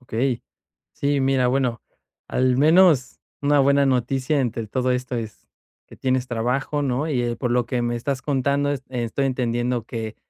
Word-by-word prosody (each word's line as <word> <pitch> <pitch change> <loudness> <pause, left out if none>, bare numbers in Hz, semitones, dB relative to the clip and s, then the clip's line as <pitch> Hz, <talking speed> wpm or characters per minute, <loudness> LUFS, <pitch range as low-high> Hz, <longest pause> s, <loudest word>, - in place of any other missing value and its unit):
Okey, 125 0 -2 0.5
sí, 140 0 0
mira, 135 -1 +2
bueno, 125 -3 0 0.5
al 125 0 +1
menos 155 -2 +4 0.2
una 145 0 +4
buena 140 0 +4
noticia 130 +3 +1
entre 115 -3 -2
todo 130 +3 -1
esto, 125 0 -2
es 110 -2 -7 0.4
que - - -15
tienes 130 -1 0
trabajo, 125 +5 -1
¿no?, 140 +3 -1
y 130 -5 0
eh, 120 -1 -2
por 125 - -2
lo 120 -1 +1
que 120 0 -1
me 120 0 -1
estás 130 +2 -3
contando 140 +1 0
e 140 - -3
estoy 125 +2 -1
entendiendo 120 -2 -1
que 115 -2 -6
130 Hz, 170 wpm, -23 LUFS, 120-140 Hz, 0.5 s, menos